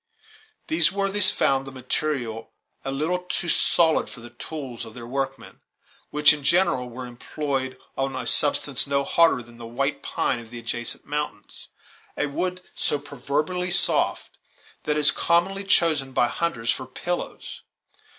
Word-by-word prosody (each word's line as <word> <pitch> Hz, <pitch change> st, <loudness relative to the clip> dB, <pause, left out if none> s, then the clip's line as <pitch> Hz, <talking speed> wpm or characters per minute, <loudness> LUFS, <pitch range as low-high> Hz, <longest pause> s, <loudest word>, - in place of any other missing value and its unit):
These 320 Hz, -10 st, +3 dB
worthies 195 Hz, 0 st, +4 dB
found 135 Hz, 0 st, +1 dB
the -, -, -6 dB
material 130 Hz, -3 st, -3 dB, 0.3 s
a 135 Hz, -, -3 dB
little 155 Hz, +6 st, 0 dB
too 180 Hz, -1 st, -3 dB
solid 165 Hz, -1 st, +3 dB
for -, -, -9 dB
the 120 Hz, +1 st, -10 dB
tools 125 Hz, -1 st, -7 dB
of 110 Hz, -1 st, -10 dB
their 120 Hz, -2 st, -8 dB
workmen, 135 Hz, +3 st, -4 dB, 0.5 s
which, 150 Hz, 0 st, +6 dB
in 150 Hz, -, -5 dB
General, 170 Hz, -5 st, +2 dB
were 125 Hz, +1 st, -7 dB
employed 130 Hz, +2 st, -3 dB, 0.2 s
on 135 Hz, 0 st, -1 dB
a 130 Hz, -1 st, -4 dB
substance 140 Hz, +1 st, +2 dB
no 140 Hz, 0 st, +1 dB
harder 165 Hz, -3 st, +3 dB
than 120 Hz, 0 st, -16 dB
the 115 Hz, -, -7 dB
white 140 Hz, +4 st, -1 dB
pine 125 Hz, -, -1 dB
of 115 Hz, -1 st, -11 dB
the 120 Hz, -, -8 dB
adjacent 120 Hz, 0 st, -3 dB
mountains, 145 Hz, -8 st, -4 dB, 0.5 s
a -, -, +1 dB
wood 180 Hz, +5 st, -2 dB
so -, -, 0 dB
proverbially 145 Hz, +6 st, -2 dB
soft -, -, +2 dB, 0.5 s
that 150 Hz, 0 st, +1 dB
it -, -, +2 dB
is 145 Hz, -, +7 dB
commonly 190 Hz, +4 st, +1 dB
chosen 155 Hz, -8 st, +3 dB
by 120 Hz, -, +4 dB
the -, -, -1 dB
hunters 120 Hz, -10 st, 0 dB
for 130 Hz, -, -4 dB
pillows. 175 Hz, +7 st, -5 dB
140 Hz, 160 wpm, -25 LUFS, 125-165 Hz, 0.5 s, is